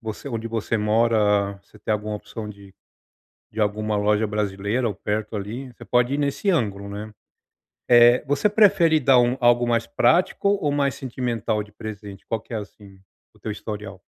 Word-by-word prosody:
você 110 +4 -6
onde 115 -2 -4
você 115 0 -2
mora, 105 -2 +2
você - - -20
tem 110 - -1
alguma 105 0 -2
opção 105 +1 -7
de 100 -2 -12 0.8
de 110 - -5
alguma 105 0 0
loja 105 +1 +2
brasileira 105 +3 -1
ou 105 - -4
perto 105 +2 -3
ali, 115 +7 -5
você - - -12
pode 125 +2 +1
ir 145 - -1
nesse 145 +7 0
ângulo, 100 - -1
né. 105 +2 -7 0.8
Eh, 120 +1 +6
você 145 +9 +2
prefere 195 -7 +4
dar 130 -2 +5
um 120 +1 +1
algo 120 0 +4
mais 115 -1 +1
prático 180 +9 +2
ou 200 -7 +1
mais 140 -2 +1
sentimental 120 -4 -2
de 105 - -15
presente? 105 -3 -9
Qual 115 -2 -2
que - - -15
é 115 - -1
assim, 100 -2 -12 0.4
o - - -22
teu 110 - -5
historial? 105 -2 -7
110 Hz, 180 wpm, -23 LUFS, 105-125 Hz, 0.8 s, Eh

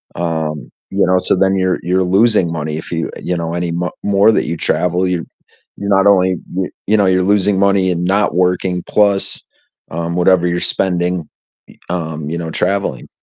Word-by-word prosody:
um, 80 -5 -3 0.2
you 100 +1 +1
know? 90 +1 +2
So 90 - +3
then 95 +1 +2
you're 95 -1 0
you're 90 +2 +1
losing 95 -1 +3
money 75 -1 -4
if 80 - -8
you 80 -1 -2
you 90 - -2
know, 85 0 -4
any 85 -1 -2
mo 90 +1 -2
more 100 +2 +4
that - - 0
you 85 - -3
travel, 90 +3 +1
you're 90 -3 -2 0.5
you're 100 0 -5
not 95 0 +3
only 95 -2 +3 0.2
you're 95 -1 -2 0.2
you 110 - +3
know, 100 - +3
you're 90 0 +2
losing 100 0 +2
money 100 -1 +2
and 85 0 -2
not 100 -1 +1
working 90 0 0
plus, 100 -2 +2 0.5
um, 85 +1 -3
whatever 90 0 +3
you're 85 0 -1
spending, 90 -3 +1 0.4
y - - -18
um, 80 -3 -4
you 85 - -3
know, 80 -1 -5
traveling. 100 -8 -2
90 Hz, 190 wpm, -16 LUFS, 85-95 Hz, 0.5 s, more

